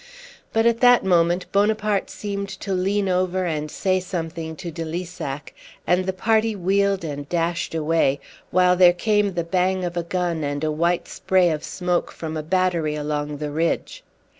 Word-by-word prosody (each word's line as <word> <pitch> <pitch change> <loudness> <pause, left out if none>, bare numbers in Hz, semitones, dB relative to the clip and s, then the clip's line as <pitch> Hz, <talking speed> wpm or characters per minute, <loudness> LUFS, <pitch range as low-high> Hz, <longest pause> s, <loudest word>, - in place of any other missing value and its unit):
But 225 0 +2
at 235 -1 +3
that 245 -3 +5
moment 175 0 +3
Bonaparte 210 0 +1
seemed 200 -1 -4
to 195 - -2
lean 195 +2 0
over 185 0 0
and 155 -3 -2
say 185 +4 0
something 165 -3 -5
to 175 0 -6
de 165 +1 -5
Lissac, 165 -4 -5 0.3
and 185 +1 +2
the - - +2
party 220 +3 +1
wheeled 195 0 +1
and 145 -2 -5
dashed 170 -1 -1
away, 155 -3 +1 0.3
while 180 0 +4
there 180 -1 +7
came 205 +1 +1
the 170 - 0
bang 185 +2 0
of 175 0 -4
a 175 - 0
gun 170 -2 -2
and 145 +1 -2
a 155 - +1
white 170 +3 0
spray 185 -1 +2
of 155 -1 -3
smoke 180 -1 -1
from 160 -1 -6
a 155 - -2
battery 170 -2 0
along 150 0 -3
the 150 0 -4
ridge. 165 +3 -1
180 Hz, 175 wpm, -23 LUFS, 160-190 Hz, 0.3 s, there